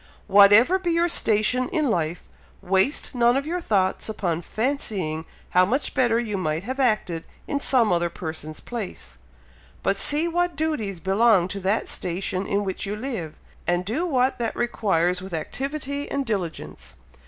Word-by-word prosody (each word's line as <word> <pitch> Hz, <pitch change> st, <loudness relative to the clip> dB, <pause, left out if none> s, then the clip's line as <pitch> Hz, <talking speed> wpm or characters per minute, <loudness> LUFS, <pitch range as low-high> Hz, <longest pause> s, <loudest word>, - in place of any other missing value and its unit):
Whatever 205 Hz, -, +6 dB
be 360 Hz, -2 st, -2 dB
your 340 Hz, +1 st, +2 dB
station 250 Hz, -2 st, +2 dB
in 310 Hz, -8 st, 0 dB
life, 165 Hz, -2 st, -2 dB, 0.3 s
waste 195 Hz, -, 0 dB
none 240 Hz, 0 st, +3 dB
of 275 Hz, -, -2 dB
your 350 Hz, +3 st, -2 dB
thoughts 195 Hz, -, 0 dB
upon 175 Hz, -6 st, -2 dB
fancying 200 Hz, -, -2 dB, 0.3 s
how 180 Hz, -, +5 dB
much 255 Hz, +10 st, -1 dB
better 235 Hz, -3 st, +2 dB
you 215 Hz, -4 st, -2 dB
might 155 Hz, -1 st, -2 dB
have 260 Hz, +5 st, -5 dB
acted 215 Hz, -10 st, +1 dB, 0.2 s
in 285 Hz, -, -1 dB
some 245 Hz, -7 st, +3 dB
other 170 Hz, 0 st, +1 dB
person's 160 Hz, -2 st, -6 dB
place, 185 Hz, -, -7 dB, 0.6 s
but 195 Hz, -, +2 dB
see 300 Hz, +8 st, +4 dB
what 350 Hz, +1 st, 0 dB
duties 245 Hz, -, -2 dB
belong 195 Hz, 0 st, +3 dB
to 200 Hz, -, -4 dB
that 195 Hz, +4 st, 0 dB
station 185 Hz, +1 st, -2 dB
in 200 Hz, +1 st, 0 dB
which 190 Hz, -2 st, -4 dB
you 205 Hz, -, -2 dB
live, 215 Hz, -, -5 dB, 0.3 s
and 175 Hz, +1 st, +1 dB
do 240 Hz, -, -1 dB
what 260 Hz, -4 st, +1 dB
that 230 Hz, -2 st, -2 dB
requires 180 Hz, -7 st, 0 dB
with 185 Hz, -2 st, -6 dB
activity 280 Hz, -, -4 dB
and 280 Hz, -1 st, -2 dB
diligence. 115 Hz, -, -5 dB
210 Hz, 160 wpm, -24 LUFS, 180-265 Hz, 0.6 s, Whatever